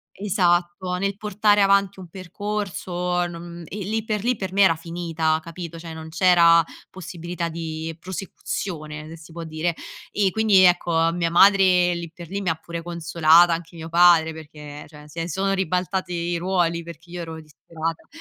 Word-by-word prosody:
Esatto, 180 Hz, -2 st, 0 dB
nel 195 Hz, +1 st, -2 dB
portare 210 Hz, 0 st, +2 dB
avanti 195 Hz, -1 st, +3 dB
un 180 Hz, -2 st, -10 dB
percorso, 180 Hz, -2 st, -3 dB
non 170 Hz, 0 st, -9 dB
e 205 Hz, -, -7 dB
lì 215 Hz, +2 st, -2 dB
per 210 Hz, -2 st, -2 dB
lì 245 Hz, 0 st, +1 dB
per 190 Hz, -2 st, -5 dB
me 200 Hz, -, 0 dB
era 165 Hz, -4 st, +5 dB
finita 165 Hz, -1 st, -2 dB
capito, 170 Hz, 0 st, -8 dB
cioè 165 Hz, -1 st, -8 dB
non 160 Hz, 0 st, -9 dB
c'era 170 Hz, -1 st, +5 dB, 0.3 s
possibilità 170 Hz, -1 st, -5 dB
di 160 Hz, -1 st, -5 dB
prosecuzione, 160 Hz, -4 st, -6 dB
se 165 Hz, -, -9 dB
si 165 Hz, 0 st, -15 dB
può 170 Hz, +1 st, -7 dB
dire. 160 Hz, +1 st, -2 dB, 0.4 s
E 200 Hz, -2 st, +1 dB
quindi, 215 Hz, -2 st, +4 dB
ecco, 170 Hz, -2 st, +3 dB
mia 170 Hz, -1 st, 0 dB
madre 180 Hz, -1 st, +5 dB
lì 170 Hz, -1 st, -6 dB
per 170 Hz, -2 st, -10 dB
lì 200 Hz, +3 st, -4 dB
mi 180 Hz, -, 0 dB
ha -, -, +1 dB
pure 170 Hz, +1 st, -7 dB
consolata, 170 Hz, 0 st, +4 dB
anche 170 Hz, +1 st, -8 dB
mio 160 Hz, 0 st, -7 dB
padre 165 Hz, -1 st, +5 dB
perché 150 Hz, -2 st, -10 dB
cioè, 150 Hz, -1 st, -14 dB
se 165 Hz, +2 st, -5 dB
sono 195 Hz, +3 st, 0 dB
ribaltati 185 Hz, 0 st, -1 dB
i 170 Hz, 0 st, -2 dB
ruoli 170 Hz, -1 st, 0 dB
perché 170 Hz, 0 st, -12 dB
io 175 Hz, 0 st, -6 dB
ero 160 Hz, -1 st, -7 dB
disperata. 160 Hz, +2 st, -6 dB
175 Hz, 170 wpm, -23 LUFS, 165-185 Hz, 0.4 s, era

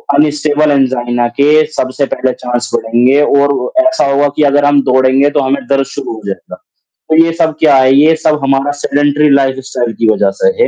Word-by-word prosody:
unstable 150 Hz, 0 st, +1 dB
angina 120 Hz, -3 st, 0 dB
के 150 Hz, +2 st, +3 dB
सबसे 130 Hz, +2 st, -2 dB
पहले 130 Hz, -1 st, -1 dB
चांस 125 Hz, 0 st, -5 dB
बढ़ेंगे 120 Hz, +5 st, +1 dB
और 140 Hz, -3 st, 0 dB
ऐसा 325 Hz, 0 st, +1 dB
हुआ 140 Hz, +1 st, +1 dB
कि 150 Hz, -, +1 dB
अगर 145 Hz, +1 st, +1 dB
हम 145 Hz, -1 st, +3 dB
दौड़ेंगे, 130 Hz, +2 st, +2 dB
तो 145 Hz, -, -1 dB
हमें 135 Hz, 0 st, -2 dB
दर्द 135 Hz, -1 st, +1 dB
शुरू 140 Hz, -5 st, -6 dB
हो 110 Hz, -, -10 dB
जाएगा, 100 Hz, -, -7 dB, 0.5 s
तो 160 Hz, -, +2 dB
ये 165 Hz, -, -1 dB
सब 165 Hz, -2 st, -1 dB
क्या 150 Hz, -3 st, +3 dB
है, 130 Hz, 0 st, +3 dB
ये 155 Hz, +3 st, +4 dB
सब 150 Hz, -1 st, 0 dB
हमारा 135 Hz, +1 st, 0 dB
सेडेंटरी 145 Hz, +1 st, +1 dB
लाइफ़स्टाइल 130 Hz, -3 st, -1 dB
की 115 Hz, -, +2 dB
वज़ह -, -, 0 dB
से -, -, +3 dB
है, 485 Hz, -, +3 dB
140 Hz, 190 wpm, -11 LUFS, 130-145 Hz, 0.5 s, ये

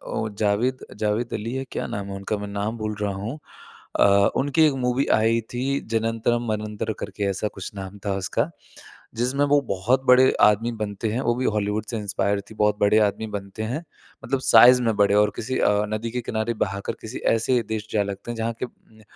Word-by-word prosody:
वो 110 Hz, -, -1 dB
जावेद 105 Hz, +5 st, 0 dB
जावेद 110 Hz, +3 st, -1 dB
अली 115 Hz, +3 st, -3 dB
है, 135 Hz, 0 st, -3 dB
क्या -, -, -3 dB
नाम 100 Hz, -1 st, -4 dB
है 100 Hz, -, -5 dB
उनका? 100 Hz, +2 st, -3 dB
मैं 105 Hz, -, -6 dB
नाम 100 Hz, +3 st, -3 dB
भूल 110 Hz, -1 st, -3 dB
रहा 100 Hz, -1 st, 0 dB
हूँ। 110 Hz, +10 st, -5 dB, 0.6 s
अ, -, -, +6 dB, 0.3 s
उनकी 145 Hz, +3 st, +1 dB
एक 150 Hz, -, +3 dB
मूवी 125 Hz, +3 st, +1 dB
आई 115 Hz, +1 st, +3 dB
थी 135 Hz, +3 st, 0 dB
जनन्तरम 115 Hz, +1 st, 0 dB
मनन्तर 105 Hz, +1 st, -3 dB
करके 105 Hz, -, -5 dB
ऐसा 100 Hz, +2 st, -1 dB
कुछ 95 Hz, -, -7 dB
नाम 95 Hz, 0 st, -7 dB
था 100 Hz, -, 0 dB
उसका। 115 Hz, -, -1 dB, 0.7 s
जिसमें 125 Hz, +5 st, 0 dB
वो 145 Hz, 0 st, +4 dB
बहुत 115 Hz, +8 st, +1 dB
बड़े 130 Hz, +1 st, +6 dB
आदमी 105 Hz, +3 st, +4 dB
बनते 105 Hz, +1 st, -2 dB
हैं, 120 Hz, +4 st, -1 dB
वो 120 Hz, -, +1 dB
भी 130 Hz, +1 st, -2 dB
हॉलीवुड 105 Hz, 0 st, -1 dB
से 115 Hz, -, -3 dB
इंस्पायर 100 Hz, -1 st, -1 dB
थी। 110 Hz, -, -12 dB
बहुत 105 Hz, -1 st, +2 dB
बड़े 105 Hz, +1 st, +4 dB
आदमी 110 Hz, +2 st, -4 dB
बनते 100 Hz, +2 st, -6 dB
हैं। 130 Hz, +9 st, -3 dB, 0.4 s
मतलब 135 Hz, +1 st, 0 dB
साइज़ 125 Hz, +1 st, +7 dB
में 115 Hz, -2 st, +1 dB
बड़े 100 Hz, 0 st, +4 dB
और 105 Hz, 0 st, +4 dB
किसी 130 Hz, +3 st, -3 dB
अ, 105 Hz, 0 st, +3 dB
नदी 110 Hz, +2 st, -3 dB
के 125 Hz, +1 st, -2 dB
किनारे 115 Hz, 0 st, -2 dB
बहाकर 100 Hz, 0 st, -4 dB
किसी 110 Hz, +3 st, -6 dB, 0.2 s
ऐसे 120 Hz, +2 st, +2 dB
देश 110 Hz, -1 st, -3 dB
जा 105 Hz, -2 st, +3 dB
लगते 100 Hz, +4 st, -6 dB
हैं -, -, -5 dB
जहाँ 115 Hz, +1 st, -1 dB
के -, -, -1 dB
उम, 110 Hz, -3 st, -20 dB
110 Hz, 205 wpm, -24 LUFS, 105-120 Hz, 0.7 s, साइज़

